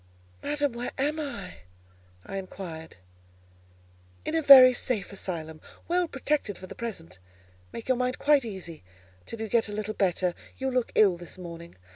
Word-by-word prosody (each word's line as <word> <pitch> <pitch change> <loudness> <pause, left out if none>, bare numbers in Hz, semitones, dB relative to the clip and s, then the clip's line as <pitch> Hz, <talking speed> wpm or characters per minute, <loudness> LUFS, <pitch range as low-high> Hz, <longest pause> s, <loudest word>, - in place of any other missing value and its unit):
"Madam, 290 -3 -1
where 240 +1 -4
am 295 +4 0
I?" 280 - -6 0.7
I 195 - -5
inquired. 175 -4 -8 1.3
"In - - -2
a 325 - +2
very 265 -3 +10
safe 225 -5 -2
asylum; 160 -5 -5 0.3
well 355 0 +1
protected 275 - -2
for 185 - -9
the - - -9
present; 195 - -7 0.5
make 230 - -8
your 255 -1 +2
mind 250 0 -1
quite 290 -2 +4
easy 190 - -8 0.4
till 230 - -6
you 220 - -3
get 225 +1 +1
a - - -5
little 215 0 -3
better; 180 -3 +1 0.2
you 265 0 -2
look 250 -2 0
ill 195 -5 +5
this 175 +1 -9
morning." 170 -1 -9
220 Hz, 160 wpm, -27 LUFS, 180-265 Hz, 1.3 s, very